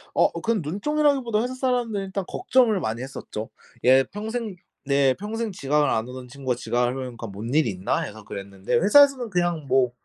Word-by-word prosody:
어 - - +4
그 230 - 0
눈총이라기보다 255 - +1
회사 250 +2 -2
사람들은 245 -6 -1
일단 190 +1 -3
걱정을 250 - +2
많이 115 -6 -3
했었죠. 125 -4 -6 0.3
예 130 +2 +6
평생 215 - -5 0.3
네 140 -1 +3
평생 220 +2 -4
지각을 150 -4 +1
안 110 -1 0
하던 125 0 -8
친구가 130 0 -3
지각을 125 +2 -1
하니까 120 -2 -8
"뭔 105 +5 -6
일이 150 -5 +3
있나?" 95 0 -1
해서 110 0 -7
그랬는데 100 -1 -4
회사에서는 255 - +5
그냥 175 -5 0
뭐 130 -2 +3
150 Hz, 390 characters per minute, -24 LUFS, -, 0.3 s, 예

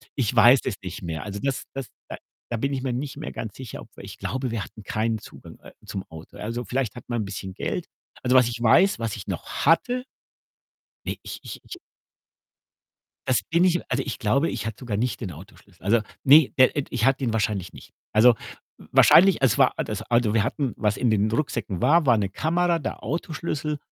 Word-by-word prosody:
ich 125 -3 0
weiß 120 +3 +7
das - - -3
nicht 90 0 -7
mehr. 80 -3 -4
Also, 100 0 -6
das 135 -2 -1
das 135 -2 -5 0.2
da - - -5 0.4
da 115 - -1
bin 140 +4 -1
ich 130 - -2
mir 130 -2 -2
nicht 135 +3 -4
mehr 155 - -6
ganz 110 -2 -6
sicher, 130 -4 -8
aber - - -13
ich - - -9
glaube, 130 -1 -3
wir 110 -3 -2
hatten 110 - -12
keinen 110 +2 -1
Zugang, - - -13
äh, - - -13
zum 95 - -5
Auto. 80 0 -12
Also, 115 +3 -4
vielleicht 125 -3 -2
hat 120 - -10
man 120 -2 -1
'n - - -3
bisschen 95 -1 -6
Geld. - - -3 0.4
Also, 125 +1 +2
was 125 -2 +6
ich 115 0 -6
weiß, 130 - +4
was 115 -3 -2
ich 100 -1 -9
noch 90 -4 -4 0.2
hatte 245 - +3 1.0
Ne, - - -1
ich - - -8
ich - - -9
ich 360 - -9 1.5
Das - - +3
bin 170 +2 +4
ich 175 -1 +3
also, - - +1
ich 135 - -5
glaube, 140 +10 +1
ich - - -4
hatte 110 -2 -4
sogar 120 -5 -3
nicht 120 +4 -1
den 100 -6 -4
Autoschlüssel. 90 +2 -16
Also 115 +4 +3 0.2
ne, 145 +1 +8
der, 130 - +5
äh, 145 - +1
d 130 - -12
ich 115 - 0
hatte 135 +1 +2
ihn 115 - 0
wahrscheinlich 105 -4 -1
nicht. - - -14 0.2
Also, 115 +2 +6 0.4
w - - -15
wahrscheinlich 190 -3 +6
es 130 -5 +3
war - - +5
a - - -1
das - - -4
also, 120 -2 +1
wir 110 - +4
hatten 130 0 -2
was 105 -1 0
in 125 -2 +1
den 110 0 +2
Rucksäcken 115 - -2
war, 150 +4 +4
war 120 -3 +5
'ne 100 -2 0
Kamera, 170 - +1
der 150 - -5
Autoschlüssel 155 -1 -3
120 Hz, 220 wpm, -24 LUFS, 105-140 Hz, 1.5 s, ne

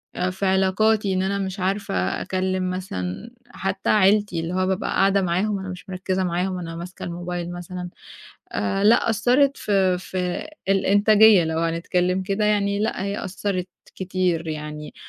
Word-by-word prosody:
آآ 180 +1 0
في 190 +2 -3
علاقاتي 195 +2 +2
إن 185 - +1
أنا 200 +1 0
مش 190 0 -4
عارفة 185 - -1
أكلِّم 185 0 -1
مثلًا 185 - -5 0.2
حتّى 195 -2 -3
عيلتي، 205 -3 +3
اللي 165 +2 -4
هو 185 0 +1
بابقى 190 -1 -1
قاعدة 195 0 +3
معاهم 190 +3 0
أنا 190 0 -6
مش 180 +2 -9
مركِّزة 185 0 -2
معاهم 180 +1 -1
أنا 165 -1 -6
ماسكة 175 +2 -8
الموبايل 175 0 -4
مثلًا. 175 0 -6 0.6
آآ 150 - -1
لأ، 230 +2 +5
أثِّرت 260 +5 +3
في 190 -3 +1
في 180 +8 -3 0.2
الإنتاجية 205 0 +5
لو 160 0 -2
هنتكلِّم 180 +3 0
كده، 195 +3 -1
يعني 200 -1 +1
لأ، 215 -3 -1
هي 200 +1 -3
أثّرِت 190 -1 -3 0.3
كتير، 180 -3 -1
يعني 150 -1 -6
185 Hz, 155 wpm, -23 LUFS, 180-200 Hz, 0.6 s, لأ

